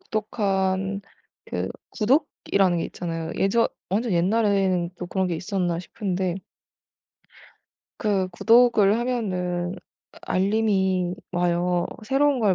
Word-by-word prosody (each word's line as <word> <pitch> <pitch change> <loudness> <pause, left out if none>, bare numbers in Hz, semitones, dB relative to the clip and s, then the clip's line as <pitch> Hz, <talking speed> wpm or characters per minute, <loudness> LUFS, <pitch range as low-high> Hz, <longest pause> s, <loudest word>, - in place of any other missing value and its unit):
구독한 195 - -1 0.5
그 - - -3 0.2
구독이라는 210 - +1
게 - - -1
있잖아요. 165 -2 -4
예전 230 +4 +3 0.2
완전 215 +3 0
옛날에는 190 -1 +2
또 180 - -5
그런 190 0 -1
게 170 - -1
있었나 175 -1 -1
싶은데 185 -2 -3 1.6
그 195 -4 +1
구독을 225 +1 +4
하면은 185 -7 -2 0.5
알림이 190 -2 +1 0.2
와요, 175 0 +1 0.2
새로운 275 +3 +2
걸 210 -5 +3
190 Hz, 230 characters per minute, -24 LUFS, 180-215 Hz, 1.6 s, 구독을